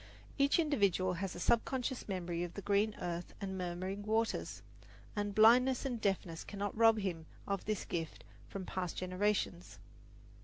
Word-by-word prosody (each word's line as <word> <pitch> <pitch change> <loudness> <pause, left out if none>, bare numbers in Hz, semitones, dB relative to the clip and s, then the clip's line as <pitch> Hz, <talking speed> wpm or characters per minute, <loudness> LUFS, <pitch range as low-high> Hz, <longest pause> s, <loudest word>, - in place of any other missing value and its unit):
Each 280 0 +4
individual 200 - +2
has 195 -2 -3
a - - -6
subconscious 250 +6 0
memory 175 -3 -2
of 175 - -6
the 200 - -6
green 205 +1 +2
earth 175 0 -4
and 195 -2 -4
murmuring 185 +2 -3
waters, 220 +2 -1 0.5
and 205 -1 -2
blindness 245 +5 +6
and 245 -4 -2
deafness 185 -5 -1
cannot 205 -1 -4
rob 225 0 +6
him 175 -6 -3 0.2
of 200 -1 -2
this 215 -2 -2
gift 165 -2 -4 0.2
from 195 -2 -6
past 180 -2 -3
generations. 185 -1 -1
200 Hz, 150 wpm, -35 LUFS, 180-220 Hz, 0.5 s, blindness